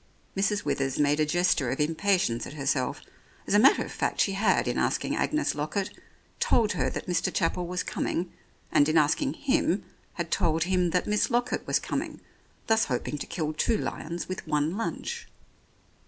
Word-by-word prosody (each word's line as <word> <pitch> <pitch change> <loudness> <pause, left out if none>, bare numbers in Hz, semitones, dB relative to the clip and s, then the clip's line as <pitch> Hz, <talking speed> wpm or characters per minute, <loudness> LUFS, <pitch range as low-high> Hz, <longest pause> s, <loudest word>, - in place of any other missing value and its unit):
Mrs. 200 +1 0
Withers 135 -1 -1
made 145 +1 +2
a 155 - +2
gesture 170 -5 +2
of 130 - -2
impatience 160 - +1
at - - -9
herself. 135 -3 -1 0.4
As - - -1
a 205 - +6
matter 265 +5 +5
of - - -9
fact - - -2
she 195 - +3
had, 200 +3 +2
in - - 0
asking - - 0
Agnes 305 0 0
Lockett, 155 +7 -2 0.5
told 220 -3 +3
her - - 0
that - - -5
Mr. 175 -3 0
Chapel 175 +1 0
was 180 +1 -2
coming, 175 +1 -2 0.4
and 145 +1 +4
in 160 - +3
asking 160 - +2
him, 270 - +1 0.3
had 170 -2 -4
told 165 -1 +2
him 180 -1 +1
that 180 +2 +1
Miss 210 0 +1
Lockett 245 0 0
was - - +3
coming, - - -4 0.5
thus 225 0 +3
hoping 130 +3 -3
to - - -5
kill 155 -2 -2
two 220 +8 +1
lions 170 -3 -4
with 185 -3 -6
one 150 +3 0
lunch. 460 - -4
175 Hz, 180 wpm, -27 LUFS, 150-205 Hz, 0.5 s, a